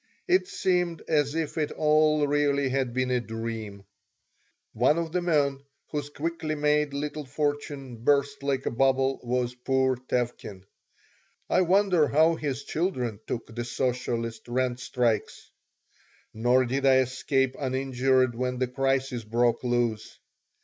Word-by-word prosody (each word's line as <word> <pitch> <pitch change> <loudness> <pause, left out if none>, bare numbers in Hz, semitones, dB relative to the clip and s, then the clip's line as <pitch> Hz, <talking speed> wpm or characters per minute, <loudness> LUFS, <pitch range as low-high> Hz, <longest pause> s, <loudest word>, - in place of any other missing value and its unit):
It 370 0 +3
seemed 180 - 0
as 150 -2 +1
if 160 -1 -2
it 150 - -1
all 155 -1 +3
really 140 -1 +1
had 130 -1 0
been 130 +1 -1
a 125 - +2
dream 115 -3 -6 0.9
One 125 +7 +3
of 165 -1 -2
the 180 +1 0
men 145 -5 +1 0.3
whose 145 -1 -3
quickly 155 +1 -3
made 150 0 +1
little 150 +1 -3
fortune 145 -2 -3
burst 140 +4 +1
like 135 -1 -1
a - - 0
bubble 135 +2 +2
was 125 0 -1
poor 130 +1 +1
Tevkin. 120 -6 -3 0.9
I - - +4
wondered 185 -3 +3
how 160 +4 +4
his 140 -4 -3
children 130 - -2
took 115 -1 -5
the 120 - -2
socialist 120 -2 -2
rent 125 0 -1
strikes 120 -4 -1 0.8
Nor 125 +3 +3
did 135 +3 -2
I 135 -1 +6
escape 135 +1 0
uninjured 130 -1 +1
when 125 +1 -2
the 130 0 0
crisis 135 -1 -1
broke 120 +2 +1
loose. 120 -3 -1
135 Hz, 135 wpm, -27 LUFS, 125-150 Hz, 0.9 s, I